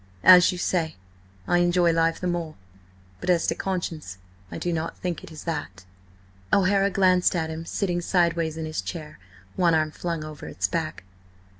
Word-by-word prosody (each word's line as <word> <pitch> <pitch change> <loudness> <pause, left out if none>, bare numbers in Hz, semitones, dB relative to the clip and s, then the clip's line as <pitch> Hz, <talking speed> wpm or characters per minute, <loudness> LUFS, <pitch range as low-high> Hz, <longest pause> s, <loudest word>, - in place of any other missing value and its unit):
"As 180 -1 +8
you 180 - -5
say, 165 -3 -1 0.5
I 175 - +3
enjoy 175 -1 +3
life 165 0 +1
the - - -5
more–but 95 - -7
as 175 -2 +3
to - - +1
conscience, 165 - -4 0.3
I - - -5
do 175 - -2
not 160 0 -3
think 175 -3 -4
it - - -11
is 155 - -9
that." 145 - -5 0.7
O'Hara 195 +1 +3
glanced 185 -2 +3
at 160 -2 -1
him 165 +1 -6
sitting 175 -3 -1
sideways 170 -3 +1
in 160 - -4
his 155 0 -3
chair, 155 -3 -7 0.4
one 170 -2 +3
arm 155 -1 +1
flung 165 -1 -4
over 155 -1 -8
its - - -1
back. 160 - -3
165 Hz, 170 wpm, -25 LUFS, 155-180 Hz, 0.7 s, As